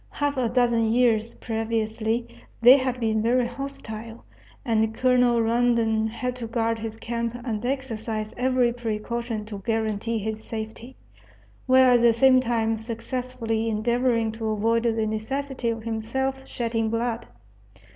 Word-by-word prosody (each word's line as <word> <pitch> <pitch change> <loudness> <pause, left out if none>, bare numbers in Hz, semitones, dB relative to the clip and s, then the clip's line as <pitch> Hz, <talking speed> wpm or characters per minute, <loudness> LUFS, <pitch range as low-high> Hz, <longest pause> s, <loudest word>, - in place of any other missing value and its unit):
Half 290 0 -1
a 245 -3 +1
dozen 235 -2 +2
years 230 -2 +2
previously 225 0 -2 0.3
they 245 +3 +9
had 255 -2 -2
been 220 -2 +1
very 240 +2 +2
hostile, 235 -3 -7 0.4
and 220 -2 +1
Colonel 245 -1 +3
Rondon 230 -1 +2
had 250 +3 -3
to 235 -2 -5
guard 230 0 -1
his 220 0 -5
camp 235 0 -3
and 220 -3 -3
exercise 225 -5 -3
every 250 -1 +2
precaution 235 -1 -3
to 210 -2 -7
guarantee 225 0 -1
his 220 +1 -4
safety, 225 +3 -7 0.7
while 260 -1 +6
at 240 - +4
the 235 -1 +5
same 255 +2 +5
time 225 -2 0
successfully 230 0 -3
endeavoring 230 +1 +1
to 225 0 -5
avoid 225 +2 +1
the 225 -1 +1
necessity 255 +4 -2
of 225 -1 -3
himself 265 +4 -3
shedding 230 -2 -1
blood. 230 +1 -2
230 Hz, 135 wpm, -25 LUFS, 220-245 Hz, 0.7 s, they